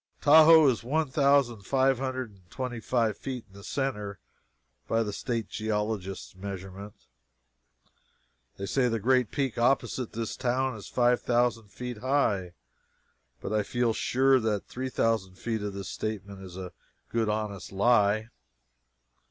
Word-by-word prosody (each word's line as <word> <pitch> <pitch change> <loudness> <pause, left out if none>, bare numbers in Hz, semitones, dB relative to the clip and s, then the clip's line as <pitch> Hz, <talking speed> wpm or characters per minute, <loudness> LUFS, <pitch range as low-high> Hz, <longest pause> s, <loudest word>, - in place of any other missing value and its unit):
Tahoe 155 +1 +8
is 120 -3 +1
one 150 +3 0
thousand 140 -5 +3
five 130 +4 +2
hundred 130 -3 -3
and 95 -3 -23
twenty 125 -3 -4
five 115 -3 0
feet 125 +1 -6
deep 95 - -25
in - - -14
the - - -13
centre, 105 -8 -3 0.7
by 115 0 +2
the 105 -2 -4
state 115 0 -3
geologist's 105 -4 -3
measurement. 95 +1 -7 1.6
They 100 - -4
say 125 +5 +1
the 115 - 0
great 125 +1 +2
peak 135 -5 -2
opposite 125 0 +1
this 115 0 -3
town 130 0 0
is 105 - -9
five 125 0 +2
thousand 120 -2 +1
feet 125 +3 -7
high: 105 -9 0 0.9
but 105 - -4
I 105 - +3
feel 120 +2 0
sure 130 +3 +3
that 110 -3 -1
three 130 +1 -5
thousand 110 -6 0
feet 115 0 -3
of 100 -1 -4
that 100 - -5
statement 100 0 -5
is 95 -1 -10
a 90 -1 -7 0.4
good 115 -2 +1
honest 105 -2 -3
lie. 105 +1 +3
115 Hz, 150 wpm, -28 LUFS, 100-130 Hz, 1.6 s, Tahoe